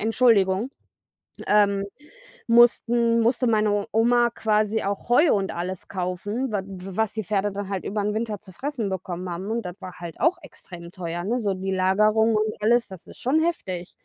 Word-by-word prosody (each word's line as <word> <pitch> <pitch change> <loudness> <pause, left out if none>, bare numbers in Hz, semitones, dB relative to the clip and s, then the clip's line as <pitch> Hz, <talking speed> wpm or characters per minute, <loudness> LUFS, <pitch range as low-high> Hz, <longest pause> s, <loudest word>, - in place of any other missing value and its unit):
Entschuldigung 220 -1 +3 0.8
ähm, 200 -1 +3 0.6
mussten 235 0 +4
musste 240 +2 +2
meine 210 -2 +1
Oma 240 +2 +3
quasi 215 -1 0
auch 200 +2 -3
Heu 285 +7 +5
und 195 -1 -1
alles 180 +1 -5
kaufen, 200 +7 -3
wa 200 -2 -1
w 190 -1 -9
was 220 -2 0
die 220 -2 -3
Pferde 205 0 0
dann 200 -1 -5
halt 195 -2 -4
übern 210 0 -2
Winter 220 -1 -2
zu 190 -3 -15
fressen 255 0 -3
bekommen 185 -1 -5
haben. 185 +4 -5
Und 230 +1 -1
das 180 -1 -6
war 185 -1 -8
halt 170 -1 -8
auch 345 +3 +2
extrem 170 -1 -12
teuer, 175 -1 -5
ne? 240 +4 -1
So 200 -3 0
die 190 +1 -3
Lagerung 215 +4 +3
und 215 0 0
alles, 235 +2 +3
das 190 -3 -12
ist - - -13
schon 285 +6 +1
heftig. 185 - -3
210 Hz, 180 wpm, -24 LUFS, 190-230 Hz, 0.8 s, Heu